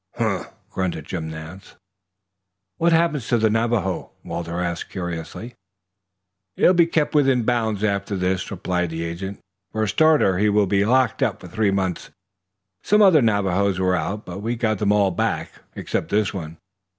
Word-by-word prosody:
"Humph!" 110 -6 -1 0.2
grunted 90 -5 -3
Jim 80 -3 -4
Nance. 80 +4 -10 1.0
"What 170 +1 +2
happens 165 -6 +2
to 120 - +2
the 110 -1 +2
Navajo?" 115 -5 0
Walter 85 0 -4
asked 85 -1 -3
curiously. 90 +6 -6 1.0
"He'll 185 - +5
be 170 -2 +4
kept 160 -3 0
within 135 -5 +3
bounds 110 -3 0
after 100 -1 -1
this," 95 0 -1
replied 90 -1 -2
the 80 +1 -4
agent. 95 +4 -5 0.3
"For 110 - -1
a - - 0
starter 150 - +3
he 105 +1 +3
will 105 0 +3
be 100 +1 +2
locked 130 +3 +2
up - - 0
for - - -11
three 110 -2 0
months. 95 -2 -2 0.7
Some 210 +1 +4
other 175 -7 +6
Navajos 100 -3 +1
were 95 0 +2
out, 100 +6 -3
but 90 +2 -7
we 115 +3 -2
got 110 -3 -1
them 105 -1 +2
all 100 -2 +3
back - - -2 0.2
except - - -3
this 105 0 +1
one. 80 -4 -6
100 Hz, 165 wpm, -22 LUFS, 90-115 Hz, 1.0 s, other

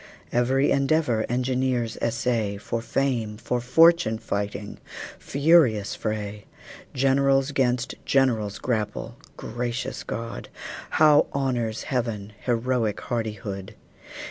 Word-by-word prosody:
Every 130 +3 +2
endeavor 140 -5 +2
engineers 125 -1 0
essay, 115 -3 0
For 115 +3 -3
fame, 115 -4 -1
for 120 +2 -2
fortune 165 -1 +5
fighting 105 -2 -4 0.4
furious 140 -8 +3
fray! 105 -1 -4 0.5
Generals 135 +1 +3
'gainst 125 -2 0
generals 115 -7 +1
grapple 115 -1 -3 0.2
gracious 120 0 -4
God! 115 +1 -6 0.5
How 150 -1 +6
honors 120 -5 -1
Heaven 110 -5 -3
heroic 120 -3 0
hardihood! 105 -3 -4
120 Hz, 90 wpm, -25 LUFS, 110-135 Hz, 0.5 s, How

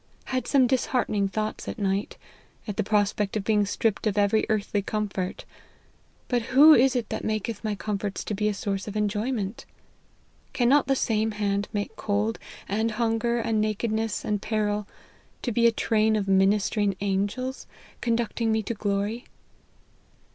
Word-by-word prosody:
Had 260 -1 -2
some 270 -3 +4
disheartening 245 -5 +1
thoughts 215 +2 -3
at - - -4
night, 200 -1 -1 0.5
at 210 - -3
the - - 0
pro 210 +1 +3
spect 205 0 -2
of 205 - -3
being 210 -1 +2
stripped 215 +1 0
of 210 -1 -1
every 205 +1 +2
earthly 210 -1 0
comfort; 200 -3 -3 0.8
but 245 -1 +1 0.2
who 310 +3 +10
is 260 -1 +4
it 240 -4 -1
that - - -4
maketh 215 0 -2
my 215 -1 -1
comforts 205 -1 -3
to - - -4
be 210 +1 0
a 210 - +1
source 195 0 -3
of 210 - -6
enjoyment? 210 0 -2 0.9
Cannot 265 +4 +3
the 270 - +3
same 220 -3 0
hand 205 -1 -1
make 205 -1 -3
cold, 210 +2 -1 0.3
and 220 +3 0
hunger, 230 +1 0
and 225 -2 0
nakedness, 220 +1 -1
and 210 -1 -1
peril, 210 -2 -1 0.6
to 245 - -1
be 235 +1 +4
a - - +4
train 220 -1 +2
of 205 -2 -1
ministering 195 +1 +2
angels 205 +7 -2 0.3
conducting 230 -1 0
me 220 0 +1
to 235 - -3
glory 205 +2 -2
215 Hz, 160 wpm, -26 LUFS, 205-230 Hz, 0.9 s, who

